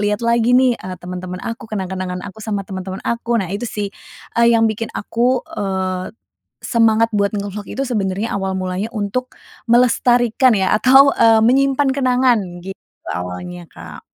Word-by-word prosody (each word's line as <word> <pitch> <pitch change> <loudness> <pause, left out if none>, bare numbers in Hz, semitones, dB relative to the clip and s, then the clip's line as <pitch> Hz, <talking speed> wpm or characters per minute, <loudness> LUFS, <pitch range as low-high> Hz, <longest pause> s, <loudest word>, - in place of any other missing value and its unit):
lihat 210 +2 -1
lagi 235 +1 +3
nih, 255 -1 +4
eee, 185 -1 -7
teman-teman 180 0 -6
aku, 230 0 -6
kenang-kenangan 185 -3 -4
aku 220 +2 -10
sama 205 -2 -3
teman-teman 190 0 -6
aku. 235 0 -1
Nah 190 -4 -2
itu 210 +4 -3
sih, 205 -1 -3 0.5
eee, 235 0 +5
yang 225 - +3
bikin 220 +1 -4
aku, 245 +4 0
eee, 190 -1 -3 0.5
semangat 225 -1 +3
buat 200 -1 +1
nge-vlog 205 0 -5
itu 270 - -3
sebenarnya 205 -2 -2
awal 190 -1 -2
mulanya 185 +3 -3
untuk 215 +5 -3 0.4
melestarikan 240 0 +3
ya 190 -1 +1
atau, 270 +4 +6
eee, 225 -1 +5
menyimpan 275 +3 +3
kenangan, 255 -3 +2 0.2
gitu 195 0 -8 0.3
awalnya 90 0 -6
Kak. - - -11
215 Hz, 155 wpm, -18 LUFS, 190-240 Hz, 0.5 s, atau